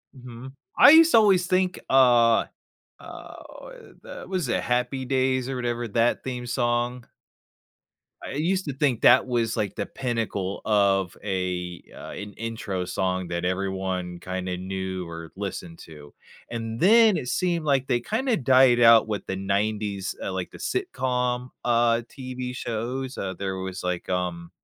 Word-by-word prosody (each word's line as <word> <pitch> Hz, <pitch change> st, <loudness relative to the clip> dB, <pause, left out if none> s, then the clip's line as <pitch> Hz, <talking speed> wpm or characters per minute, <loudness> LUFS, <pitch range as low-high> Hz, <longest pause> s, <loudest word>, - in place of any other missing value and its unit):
Mhm. 125 Hz, 0 st, -11 dB, 0.2 s
I -, -, +9 dB
used 325 Hz, +1 st, +7 dB
to -, -, +6 dB
always 195 Hz, -5 st, +4 dB
think, 185 Hz, 0 st, +1 dB
uh, 120 Hz, -3 st, +5 dB, 0.6 s
uh, -, -, -11 dB
o -, -, -13 dB
the -, -, -9 dB
was 180 Hz, -8 st, -2 dB
it 115 Hz, -, 0 dB
Happy 125 Hz, +2 st, -1 dB
Days 130 Hz, -1 st, 0 dB
or 135 Hz, -, -3 dB
whatever, 120 Hz, -1 st, -3 dB
that 115 Hz, +3 st, +1 dB
theme 125 Hz, -2 st, -5 dB
song? 120 Hz, 0 st, -1 dB, 1.2 s
I -, -, -6 dB
used 180 Hz, +7 st, -1 dB
to 145 Hz, -, -3 dB
think 135 Hz, -4 st, 0 dB
that -, -, +6 dB
was, 115 Hz, -3 st, 0 dB
like, 100 Hz, -2 st, -2 dB
the -, -, -3 dB
pinnacle 115 Hz, -6 st, -3 dB
of 100 Hz, -4 st, +2 dB
a, 90 Hz, -3 st, -3 dB
uh -, -, -9 dB
an 105 Hz, 0 st, -8 dB
intro 110 Hz, -5 st, -4 dB
song 95 Hz, -1 st, -2 dB
that 85 Hz, +1 st, -3 dB
everyone 95 Hz, -1 st, -3 dB
kinda 90 Hz, 0 st, -4 dB
knew 95 Hz, -1 st, -5 dB
or 85 Hz, -1 st, -9 dB
listened 90 Hz, -4 st, -6 dB
to, 75 Hz, -2 st, -14 dB, 0.4 s
and 115 Hz, -1 st, -5 dB
then 220 Hz, -, +6 dB
it 125 Hz, -, -4 dB
seemed 170 Hz, -1 st, -1 dB
like 135 Hz, -3 st, +1 dB
they 120 Hz, -, +1 dB
kinda 230 Hz, -, 0 dB
died 130 Hz, -, +4 dB
out 115 Hz, -1 st, +7 dB
with 105 Hz, -2 st, -4 dB
the 95 Hz, -, -4 dB
'90s, 100 Hz, 0 st, -2 dB
uh, 95 Hz, -, -4 dB
like 95 Hz, -1 st, -4 dB
the -, -, -11 dB
sitcom, 125 Hz, -, -2 dB
uh, 120 Hz, -1 st, +2 dB
TV 130 Hz, -1 st, -6 dB
shows, 125 Hz, +3 st, -4 dB
uh, 95 Hz, -1 st, -3 dB
there 95 Hz, 0 st, -4 dB
was, 95 Hz, -1 st, -6 dB
like, 90 Hz, -1 st, -3 dB
um 90 Hz, -2 st, -3 dB
115 Hz, 160 wpm, -25 LUFS, 95-130 Hz, 1.2 s, I